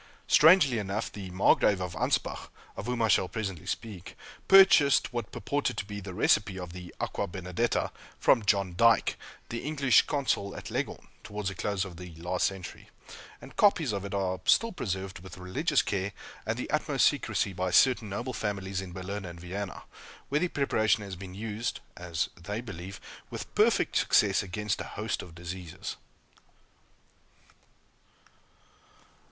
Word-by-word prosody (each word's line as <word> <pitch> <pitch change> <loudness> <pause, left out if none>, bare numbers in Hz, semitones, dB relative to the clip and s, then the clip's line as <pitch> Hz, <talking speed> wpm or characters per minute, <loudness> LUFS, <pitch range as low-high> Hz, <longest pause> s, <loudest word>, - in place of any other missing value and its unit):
Strangely 155 -7 +6
enough, 100 +2 -3
the 100 -2 -7
Margrave 95 +1 +3
of 90 -2 -4
Anspach, 80 - -1 0.3
of - - -6
whom 125 -2 0
I - - +4
shall 95 -3 +3
presently 95 -5 -5
speak, 100 -6 -5 0.3
purchased 190 -10 +6
what 120 -4 -3
purported 145 +8 -2
to - - -2
be 100 0 -6
the 95 -2 -8
recipe 105 -2 +2
of 90 -2 -7
the 90 -1 -9
"Aqua - - -2
Benedetta," 90 +5 -1 0.3
from 120 - +4
John 100 -2 +1
Dyke, 115 +4 +4 0.3
the 115 - -3
English 140 -3 +3
Consul 130 -8 -1
at - - -8
Leghorn, - - -3 0.2
towards 105 -1 -4
the - - -6
close 100 -1 -1
of 90 -3 -9
the 90 -2 -9
last 90 +2 0
century; 95 -2 -8 0.5
and - - -13
copies 170 - +4
of 100 -2 -3
it 100 0 -4
are 95 -2 -1
still 230 0 +4
preserved 95 - -4
with 90 0 -11
religious 90 0 +1
care 100 0 -2 0.3
and - - -1
the - - -4
utmost - - +2
secrecy 100 - +1
by 90 +1 -1
certain 120 +3 +4
noble 120 +6 -4
families 95 -3 -3
in 90 -2 -8
Berlin 95 +3 -5
and 85 -2 -8
Vienna, 95 +3 -5 0.5
where 145 +2 +2
the 180 - +2
preparation 110 -9 +1
has 100 -2 -6
been 90 0 -9
used 110 +2 -3 0.2
(as 85 -1 -2
they 100 +5 -5
believe) 95 -4 -8 0.3
with - - -7
perfect - - +3
success 100 -2 +4
against 105 +2 -2
a - - -8
host - - -2
of 85 -2 -12
diseases. 90 0 -6
100 Hz, 160 wpm, -29 LUFS, 90-115 Hz, 0.5 s, Strangely